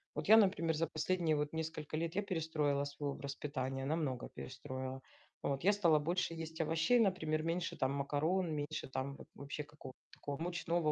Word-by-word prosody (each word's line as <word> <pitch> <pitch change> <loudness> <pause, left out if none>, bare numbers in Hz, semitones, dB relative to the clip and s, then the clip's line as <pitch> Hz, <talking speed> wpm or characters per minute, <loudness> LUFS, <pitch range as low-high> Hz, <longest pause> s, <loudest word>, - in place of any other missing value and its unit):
Вот - - -3
я, 220 - +11
например, 185 -6 +4
за 165 +1 +1
последние 165 0 +1
вот 150 +1 -1
несколько 160 -1 -3
лет 165 +2 -2
я 205 - +2
перестроила 155 -6 0
свой 145 0 -3
образ 140 0 -5
питания, 135 -2 -3
намного 145 -4 -1
перестроила. 130 0 -5 0.4
Вот 135 0 -1
я 205 - +7
стала 170 -7 +4
больше 170 +2 0
есть 160 0 -4
овощей, 160 +9 +3
например, 160 -7 +2
меньше 165 +1 -1
там 130 0 +1
макарон, 155 +6 +1
меньше 150 +1 -3
там 130 +1 -3
вот - - -12
вообще 140 +1 -5
какого-то 145 -3 -12 0.2
такого 145 -1 -4
мучного. 170 -2 0
155 Hz, 175 wpm, -36 LUFS, 140-165 Hz, 0.4 s, я